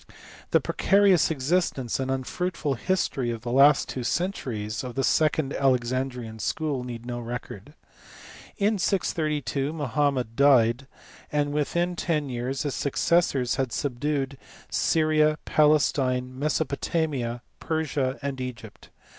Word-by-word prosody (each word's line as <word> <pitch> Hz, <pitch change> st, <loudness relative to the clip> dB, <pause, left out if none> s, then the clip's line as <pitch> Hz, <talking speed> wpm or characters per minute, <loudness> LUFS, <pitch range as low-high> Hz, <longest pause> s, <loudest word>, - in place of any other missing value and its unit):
The -, -, +4 dB
precarious 195 Hz, -3 st, +3 dB
existence 140 Hz, -4 st, 0 dB
and 130 Hz, 0 st, -2 dB
unfruitful 145 Hz, +4 st, -2 dB
history 135 Hz, -4 st, -1 dB
of 115 Hz, -1 st, -4 dB
the 120 Hz, -, -3 dB
last 140 Hz, +3 st, +5 dB
two 130 Hz, -, -4 dB
centuries 125 Hz, -, -2 dB
of 125 Hz, -2 st, -6 dB
the 135 Hz, -, 0 dB
second 155 Hz, 0 st, +2 dB
Alexandrian 125 Hz, -3 st, -1 dB
School 145 Hz, 0 st, -2 dB
need 120 Hz, -1 st, -7 dB
no 120 Hz, -1 st, -4 dB
record. 120 Hz, +2 st, -7 dB, 0.8 s
In 210 Hz, 0 st, +1 dB
632 150 Hz, -, -1 dB
Mohammed 140 Hz, -5 st, -1 dB
died, 130 Hz, -2 st, +4 dB, 0.4 s
and 145 Hz, -1 st, 0 dB
within 170 Hz, +4 st, 0 dB
ten 155 Hz, -5 st, -1 dB
years 125 Hz, +2 st, -3 dB
his 145 Hz, -3 st, -2 dB
successors 140 Hz, -3 st, +1 dB
had 130 Hz, -3 st, -1 dB
subdued 140 Hz, 0 st, -2 dB, 0.3 s
Syria, 155 Hz, -1 st, +2 dB
Palestine, 135 Hz, -4 st, +2 dB
Mesopotamia, 140 Hz, -4 st, -1 dB, 0.2 s
Persia, 150 Hz, -4 st, -1 dB
and 135 Hz, -2 st, -3 dB
Egypt. 120 Hz, -4 st, -8 dB
135 Hz, 115 wpm, -26 LUFS, 125-155 Hz, 0.8 s, last